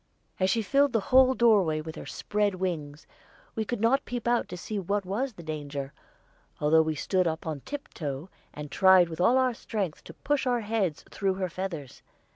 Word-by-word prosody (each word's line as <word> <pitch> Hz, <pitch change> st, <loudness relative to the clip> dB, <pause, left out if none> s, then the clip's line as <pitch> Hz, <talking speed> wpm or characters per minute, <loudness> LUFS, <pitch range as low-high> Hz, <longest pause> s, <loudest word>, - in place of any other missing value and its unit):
As 185 Hz, 0 st, +2 dB
she 225 Hz, +3 st, +1 dB
filled 275 Hz, +5 st, +3 dB
the 225 Hz, -, +3 dB
whole 260 Hz, 0 st, +7 dB
doorway 200 Hz, -11 st, +4 dB
with 160 Hz, +1 st, -6 dB
her -, -, -8 dB
spread 205 Hz, -2 st, -1 dB
wings, 160 Hz, -5 st, -4 dB, 0.5 s
we 220 Hz, -, -1 dB
could 240 Hz, +1 st, -3 dB
not 235 Hz, +6 st, +3 dB
peep 245 Hz, -1 st, -5 dB
out 240 Hz, 0 st, +2 dB
to 180 Hz, -, -6 dB
see 205 Hz, +4 st, -4 dB
what 200 Hz, +1 st, -1 dB
was 235 Hz, +8 st, -2 dB
the 175 Hz, -, -11 dB
danger, 145 Hz, -3 st, -5 dB, 0.7 s
although 155 Hz, +2 st, +5 dB
we 160 Hz, -1 st, -1 dB
stood 185 Hz, +4 st, +1 dB
on 160 Hz, -2 st, -3 dB
tiptoe 160 Hz, -, -5 dB, 0.2 s
and 150 Hz, -1 st, -8 dB
tried 190 Hz, -1 st, +6 dB
with 160 Hz, +1 st, -5 dB
all 240 Hz, +8 st, +5 dB
our 255 Hz, -1 st, +2 dB
strength 205 Hz, -8 st, -4 dB
to -, -, -11 dB
push 290 Hz, -2 st, -1 dB
our 245 Hz, -1 st, +1 dB
heads 210 Hz, -7 st, -1 dB
through 195 Hz, -2 st, 0 dB
her 185 Hz, -1 st, -2 dB
feathers. 165 Hz, -8 st, -6 dB
190 Hz, 190 wpm, -28 LUFS, 160-230 Hz, 0.7 s, whole